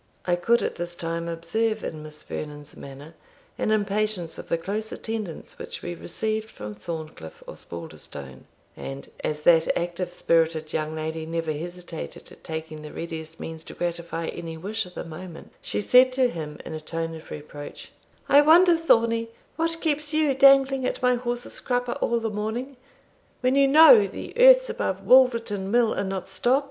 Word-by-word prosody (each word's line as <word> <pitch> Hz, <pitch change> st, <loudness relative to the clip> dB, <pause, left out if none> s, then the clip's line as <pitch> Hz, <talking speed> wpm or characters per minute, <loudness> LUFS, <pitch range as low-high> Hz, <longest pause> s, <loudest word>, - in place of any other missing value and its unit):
I 175 Hz, -, +2 dB
could 230 Hz, +7 st, +2 dB
at -, -, -2 dB
this 175 Hz, 0 st, -3 dB
time 165 Hz, 0 st, -3 dB
observe 215 Hz, +7 st, -1 dB
in 155 Hz, -, -5 dB
Miss 150 Hz, 0 st, -10 dB
Vernon's 150 Hz, -1 st, -7 dB
manner 140 Hz, +4 st, -11 dB, 0.5 s
an -, -, 0 dB
impatience 210 Hz, -4 st, 0 dB
of -, -, -10 dB
the 170 Hz, -, +2 dB
close 210 Hz, +6 st, -4 dB
attendance 215 Hz, -7 st, -6 dB
which -, -, -7 dB
we 175 Hz, -, -4 dB
received 215 Hz, +6 st, -3 dB
from 105 Hz, -, -8 dB
Thorncliff 155 Hz, -, -8 dB
Osbaldistone; 70 Hz, -5 st, -9 dB, 0.3 s
and, 70 Hz, 0 st, -8 dB
as 150 Hz, 0 st, -2 dB
that 165 Hz, 0 st, +5 dB
active 175 Hz, +1 st, -3 dB
spirited 165 Hz, -2 st, +1 dB
young 155 Hz, 0 st, -2 dB
lady 160 Hz, 0 st, -4 dB
never 165 Hz, -1 st, -2 dB
hesitated 175 Hz, +1 st, -7 dB
at -, -, -16 dB
taking 160 Hz, -1 st, -6 dB
the 150 Hz, -, -9 dB
readiest 160 Hz, -1 st, -7 dB
means 160 Hz, -1 st, -7 dB
to -, -, -10 dB
gratify 170 Hz, -1 st, -3 dB
any 165 Hz, -1 st, -6 dB
wish 205 Hz, +4 st, -3 dB
of 180 Hz, -, -16 dB
the -, -, -5 dB
moment, 165 Hz, +1 st, -10 dB
she -, -, -2 dB
said 250 Hz, +4 st, +6 dB
to 255 Hz, -1 st, +3 dB
him, 150 Hz, -2 st, -6 dB
in -, -, -6 dB
a 155 Hz, -, -5 dB
tone 165 Hz, +1 st, -4 dB
of 160 Hz, 0 st, -11 dB
reproach 145 Hz, -1 st, -9 dB, 0.4 s
"I 285 Hz, -, +7 dB
wonder, 340 Hz, +4 st, +7 dB
Thornie, 230 Hz, -8 st, +2 dB, 0.3 s
what 330 Hz, 0 st, -1 dB
keeps 300 Hz, -1 st, -1 dB
you 310 Hz, -3 st, +3 dB
dangling 270 Hz, 0 st, +5 dB
at 255 Hz, -, -2 dB
my 250 Hz, 0 st, +5 dB
horse's 245 Hz, 0 st, -3 dB
crupper 245 Hz, -1 st, -1 dB
all 235 Hz, 0 st, +1 dB
this 225 Hz, -2 st, -3 dB
morning, 225 Hz, +6 st, -3 dB, 0.7 s
when 255 Hz, 0 st, +2 dB
you 275 Hz, 0 st, +5 dB
know 320 Hz, -, +8 dB
the -, -, -8 dB
earths -, -, +7 dB
above -, -, -3 dB
Woolverton 230 Hz, -6 st, +4 dB
mill 235 Hz, 0 st, +3 dB
are -, -, -1 dB
not 190 Hz, -1 st, -4 dB
stopt." 255 Hz, +3 st, +2 dB
180 Hz, 175 wpm, -25 LUFS, 160-245 Hz, 0.7 s, know